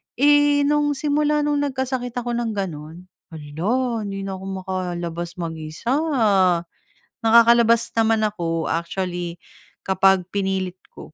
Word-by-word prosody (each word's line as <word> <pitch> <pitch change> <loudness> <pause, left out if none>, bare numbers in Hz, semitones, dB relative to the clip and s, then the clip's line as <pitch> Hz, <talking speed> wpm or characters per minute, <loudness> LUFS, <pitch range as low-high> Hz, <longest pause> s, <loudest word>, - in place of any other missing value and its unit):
Eh, 290 +1 +4
nung 295 0 +1
simula 295 +1 +1
nung 295 -1 0
nagkasakit 260 -3 -3
ako 245 -1 -3
ng 225 -3 -3
ganun, 165 -2 -6 0.3
hala, 210 - -2
hindi 195 0 -5
na 195 -1 -5
ako 190 - -10 0.2
makalabas 175 -2 -4
mag-isa. 160 - -3 1.2
Nakakalabas 235 0 +5
naman 225 -1 +2
ako 165 -6 -2
actually, 175 0 -3 0.5
kapag 190 -1 +3
pinilit 190 -2 -2
ko. - - -13
200 Hz, 115 wpm, -22 LUFS, 175-250 Hz, 1.2 s, Nakakalabas